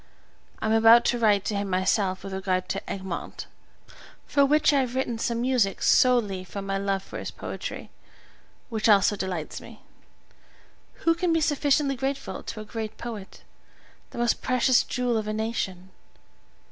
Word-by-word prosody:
I - - -5
am 220 - +1
about 225 +1 +7
to 240 - +1
write 205 -3 +3
to 210 - -1
him 200 0 -2
myself 185 +1 0
with 195 - -6
regard 185 -1 -1
to 195 - -4
"Egmont," 190 -3 -5 0.8
for 280 - +3
which 300 +2 +4
I 280 - +4
have 255 -2 -2
written 245 -3 -1
some 235 0 -1
music 240 -6 +1
solely 220 -7 +3
from 195 +2 -7
my 195 0 -1
love 195 -1 -1
for - - -8
his - - -5
poetry, - - -7 0.8
which 225 -1 0
always 200 -2 +6
delights 190 -6 -4
me. - - -14 1.2
Who 330 - +5
can 340 +1 0
be 330 - +3
sufficiently 290 -2 +1
grateful 270 +2 -3
to 215 - -7
a - - -9
great 220 0 -6
poet, 220 -5 -8 0.7
the - - -11
most 240 0 +1
precious 255 0 +3
jewel 245 -2 -1
of 215 -1 -3
a 215 - -2
nation! 195 -4 -3
220 Hz, 165 wpm, -26 LUFS, 195-250 Hz, 1.2 s, about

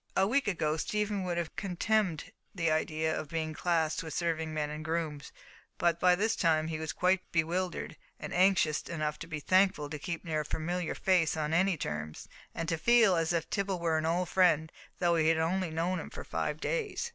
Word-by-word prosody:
A 190 - +5
week 265 +6 +1
ago, 155 -5 0
Stephen 210 +1 -1
would 175 -1 -2
have 170 -2 -3
contemned 190 -2 0 0.2
the 165 -3 +1
idea 155 0 0
of 150 - -5
being 160 -1 -2
classed 160 -1 0
with 160 -1 -6
serving 160 -2 -1
men 150 -1 -2
and 150 +1 -6
grooms, 160 -3 -3 0.5
but 170 -1 +1
by 180 0 +5
this 220 +4 +1
time 160 -1 +2
he 155 -1 -3
was 160 0 -3
quite 185 +1 +2
bewildered, 175 +2 -1 0.2
and - - -6
anxious 180 -5 +3
enough 155 -3 -3
to 165 - -7
be 155 -2 -4
thankful 185 -3 +2
to 150 - -4
keep 170 +3 -5
near 155 -2 -1
a - - -7
familiar 175 +3 -2
face 175 -4 +2
on 155 0 -1
any 185 +1 +3
terms, 75 - -5 0.3
and 165 - -3
to 165 -2 -1
feel 230 -1 +5
as 165 0 +1
if 170 -1 -1
Tibble 195 -2 -1
were 165 -2 +1
an 160 - -1
old 175 +2 +1
friend, 160 -4 +3 0.3
though 175 -1 +2
he 160 -1 +2
had 165 0 +4
only 175 +3 0
known 170 +3 -1
him - - -7
for - - -8
five - - -3
days. 470 -1 -2
165 Hz, 205 wpm, -31 LUFS, 155-185 Hz, 0.5 s, A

